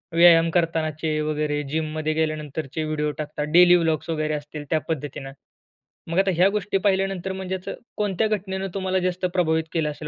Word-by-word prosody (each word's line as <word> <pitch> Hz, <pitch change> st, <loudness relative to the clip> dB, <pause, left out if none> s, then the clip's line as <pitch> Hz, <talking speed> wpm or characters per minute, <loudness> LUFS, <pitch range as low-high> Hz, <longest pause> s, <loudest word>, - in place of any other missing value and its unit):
व्यायाम 170 Hz, -1 st, +7 dB
करतानाचे 160 Hz, -2 st, 0 dB
वगैरे 150 Hz, -1 st, -1 dB
जिममध्ये 155 Hz, 0 st, -1 dB
गेल्यानंतरचे 155 Hz, -1 st, -2 dB
व्हिडिओ 155 Hz, -1 st, -1 dB
टाकतात. 150 Hz, -1 st, -4 dB
डेली 180 Hz, +1 st, +8 dB
ब्लॉग्स 160 Hz, -1 st, 0 dB
वगैरे 155 Hz, -1 st, -1 dB
असतील 150 Hz, 0 st, -6 dB
त्या 160 Hz, -, +2 dB
पद्धतीने. 145 Hz, -3 st, -4 dB, 0.8 s
मग 165 Hz, -, -1 dB
आता 195 Hz, 0 st, +3 dB
ह्या 180 Hz, +3 st, +5 dB
गोष्टी 205 Hz, -1 st, -1 dB
पाहिल्यानंतर, 195 Hz, -1 st, 0 dB
म्हणजे 190 Hz, 0 st, -4 dB
असं 185 Hz, -, -6 dB, 0.2 s
कोणत्या 210 Hz, 0 st, +1 dB
घटनेनं 195 Hz, -2 st, -2 dB
तुम्हाला 190 Hz, -1 st, 0 dB
जास्त 185 Hz, 0 st, -1 dB
प्रभावित 160 Hz, -3 st, +2 dB
केलं 160 Hz, -3 st, 0 dB
असेल? 150 Hz, +1 st, -7 dB
160 Hz, 160 wpm, -24 LUFS, 155-185 Hz, 0.8 s, डेली